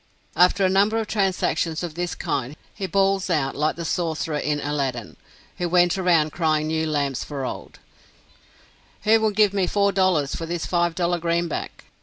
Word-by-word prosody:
After 185 +2 +4
a - - +5
number 200 +4 +2
of 225 - -1
transactions 185 -5 0
of 170 -3 -4
this 175 +1 -3
kind, 135 +1 -3 0.2
he 195 - -4
bawls 195 +1 +1
out, 145 -6 0
like 150 +2 0
the 170 - -6
sorcerer 160 -3 -2
in 150 0 -1
Aladdin, 140 -6 -3 0.4
who 175 -1 -1
went 175 0 +3
around 170 -5 +2
crying 155 -2 0
new 160 0 -1
lamps 140 -4 -1
for 140 -3 -5
old, - - -7 1.3
"Who 220 +1 +5
will 220 0 +2
give 210 -1 +3
me 195 -3 +1
four 200 +1 +2
dollars 180 -7 +1
for 165 - -4
this 170 0 -3
five 175 -1 0
dollar 175 0 0
greenback?" 170 0 -2
170 Hz, 175 wpm, -23 LUFS, 155-190 Hz, 1.3 s, a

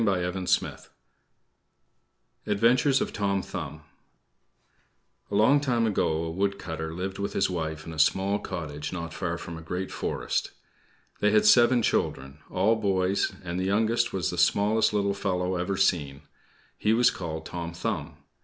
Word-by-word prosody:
ADVENTURES 120 +6 +3
OF - - -2
TOM 100 -1 0
THUMB 80 - -6 1.5
A 100 - -3
long 115 +8 +5
time 125 -5 +1
ago, 80 -6 0
a 80 - -3
woodcutter 85 -4 -2
lived 95 +4 -5
with 100 - -3
his 95 - +1
wife 80 -3 -4
in 80 - -7
a 80 - -7
small 95 +5 +2
cottage 75 -7 -5
not 85 -3 -5
far 85 -2 -3
from 85 -1 -7
a - - -10
great 90 +3 -4
forest. - - -2 0.7
They 105 - +3
had 105 0 +4
seven 120 0 +6
children 65 -7 -1
all 105 +5 +2
boys; 95 -2 +1
and 90 0 -3
the 95 - -1
youngest 115 +4 +1
was 95 -4 -1
the 90 - -4
smallest 105 +5 +3
little 100 -1 +1
fellow 95 -2 -1
ever 90 +2 -2
seen. 75 -7 +1 0.6
He 105 - +2
was 120 +1 +4
called 80 -3 -5
Tom 85 -1 -5
Thumb. 85 - -4
95 Hz, 145 wpm, -27 LUFS, 85-105 Hz, 1.5 s, seven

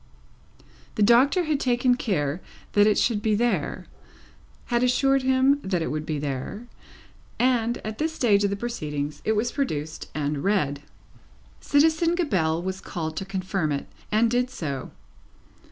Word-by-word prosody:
The 210 - +2
Doctor 260 - +5
had 305 -3 0
taken 250 -1 +2
care 175 - -1 0.3
that 205 0 +5
it 210 - +3
should 220 -4 +1
be 215 -1 +2
there 240 +3 -1 0.9
had 240 - +3
assured 270 +2 +3
him 260 +2 +3
that 185 -6 -1
it - - -3
would 155 +1 -4
be 155 - -1
there 140 - -4 0.7
and 240 -2 +2
at 215 0 -5
this 315 +1 0
stage 215 -9 +2
of 200 - +2
the 200 - -1
proceedings 150 -10 -4
it 220 - +2
was 230 +3 0
produced 155 - -3
and 145 -1 -2
read. 150 -9 0 0.8
Citizen 320 +3 +3
Gabelle 175 - 0
was 190 +1 -4
called 160 -2 -5
to 195 - -3
confirm 190 -4 -2
it, 140 -1 -2 0.3
and 225 +2 +3
did 245 +1 +1
so. 140 - -5
210 Hz, 155 wpm, -25 LUFS, 160-250 Hz, 0.9 s, Doctor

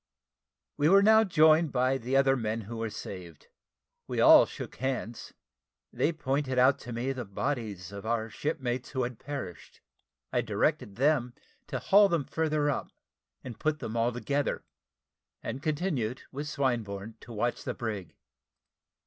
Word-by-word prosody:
We 150 +1 +3
were 195 +2 +6
now 220 +1 +7
joined 160 -4 +4
by 130 +1 +1
the 125 +3 -2
other 135 0 +4
men 115 -2 -2
who 115 +3 -7
were 115 0 -2
saved. 90 -6 -9 0.6
We - - -3
all - - +8
shook - - -8
hands. 125 -3 -4 0.6
They 160 - +1
pointed 140 -3 -2
out 130 +2 +5
to 120 - -9
me 120 +3 -2
the 130 -2 -4
bodies 105 -4 -4
of 100 -1 -8
our 110 0 -1
shipmates 125 -1 -3
who 130 -2 -1
had 120 -1 -5
perished. 130 - -7 0.5
I - - +3
directed 100 - -1
them 130 -1 +1 0.3
to 130 - -3
haul 200 +10 +5
them 165 -6 0
further 155 0 0
up, 145 - -1 0.5
and 120 -4 -8
put 155 -1 0
them 115 -6 -6
altogether; 120 +5 -1 0.8
and 125 +4 -4
continued, 145 - -2
with 145 +2 -5
Swinburne, 115 -7 -2
to 120 - -13
watch 120 +2 -2
the - - -4
brig. 105 -8 -5
130 Hz, 150 wpm, -29 LUFS, 115-145 Hz, 0.8 s, all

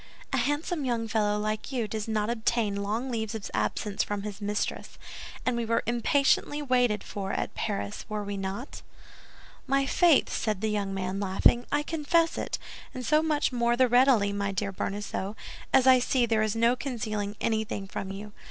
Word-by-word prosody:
"A - - +3
handsome 290 +5 0
young 235 -3 -1
fellow 210 -2 +1
like 215 +4 -3
you 240 -5 -1
does 215 0 -4
not 215 0 0
obtain 220 -2 0
long 225 +6 -2
leaves 220 -2 -2
of 215 - -6
absence 210 -1 -1
from 205 -1 -3
his 210 0 -6
mistress; 205 0 -3 0.5
and 255 - +1
we 235 - -1
were 230 0 +1
impatiently 270 +5 +2
waited 245 -7 +2
for 195 -1 -4
at - - -2
Paris, 100 0 -3
were 210 -1 -2
we 200 0 -4
not?" 195 +6 -5 0.9
"My 275 +1 +2
faith!" 335 +1 +4
said 210 -3 -1
the 220 -1 0
young 200 -2 -1
man, 190 0 -2
laughing, 200 +5 +3
"I 290 0 +2
confess 325 +2 +1
it, - - -2 0.4
and 255 -1 -5
so 305 +3 +4
much 305 -3 +1
more 240 -1 +1
the 255 0 +5
readily, 245 -5 +4
my 200 0 -1
dear 195 +1 -2
Bonacieux, 200 +1 -3 0.4
as 265 -1 +5
I 260 -1 +7
see 250 0 +2
there 225 -2 +1
is 215 -1 0
no 230 +2 +3
concealing 215 -6 -3
anything 220 -3 -1
from 195 0 -5
you. 205 +2 -7
220 Hz, 180 wpm, -28 LUFS, 205-255 Hz, 0.9 s, I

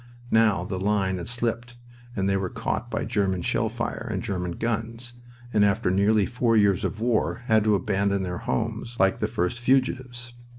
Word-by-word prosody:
Now 110 -5 +4
the 95 0 -4
line 95 -1 +1
had 85 - -6
slipped 120 0 -3 0.4
and 95 -1 0
they 100 - +2
were 95 -2 -1
caught - - -3
by - - -2
German 95 -3 0
shell 115 +3 +1
fire 115 +1 -4
and 95 0 -2
German 90 -5 -2
guns, 115 +3 -3 0.4
and 105 - +4
after 100 -1 +2
nearly 100 +2 +3
four 120 -2 +1
years 100 -3 +3
of 110 - -2
war 115 +1 0
had 110 -2 +4
to 105 -1 +4
abandon 100 0 0
their 90 -1 -3
homes 115 +1 -3
like 95 0 +3
the - - 0
first 90 +8 -1
fugitives. 125 -1 0
110 Hz, 180 wpm, -25 LUFS, 95-120 Hz, 0.4 s, Now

